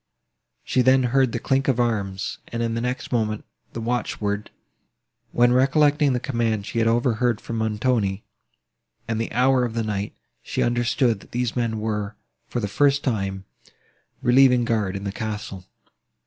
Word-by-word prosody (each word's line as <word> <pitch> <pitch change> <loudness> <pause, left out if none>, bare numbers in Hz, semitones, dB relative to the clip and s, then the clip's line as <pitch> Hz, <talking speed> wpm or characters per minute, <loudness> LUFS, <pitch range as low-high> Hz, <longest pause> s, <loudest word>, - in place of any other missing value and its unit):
She 130 - +1
then 130 +1 +4
heard 130 0 +2
the - - -2
clink 135 +3 0
of 130 -3 +2
arms, 100 -5 -1
and, 115 0 -3
in 115 -1 -1
the 115 - -2
next 125 +1 -3
moment, 110 -3 -1 0.3
the - - -5
watch 120 0 -2
word; 100 0 -2 0.8
when, 120 0 +4
recollecting 145 +2 +3
the 125 - 0
command 115 -5 -1
she 115 - -3
had 115 - +2
overheard 120 -1 +1
from 115 -1 -5
Montoni, 110 -2 0 0.8
and 115 0 -1
the 115 - -3
hour 125 +1 +3
of 115 -2 -3
the 115 - 0
night, 105 -1 -3 0.3
she - - -2
understood, 120 -1 +1
that - - -17
these 120 -1 -1
men 115 -3 -1
were, 105 -1 -3 0.3
for - - -3
the 105 - -2
first 140 +7 +2
time, 95 -6 -2 0.8
relieving 125 -1 +5
guard 105 -5 0
in 100 - -5
the 100 - -3
castle. 105 -4 -5
115 Hz, 165 wpm, -23 LUFS, 105-125 Hz, 0.8 s, relieving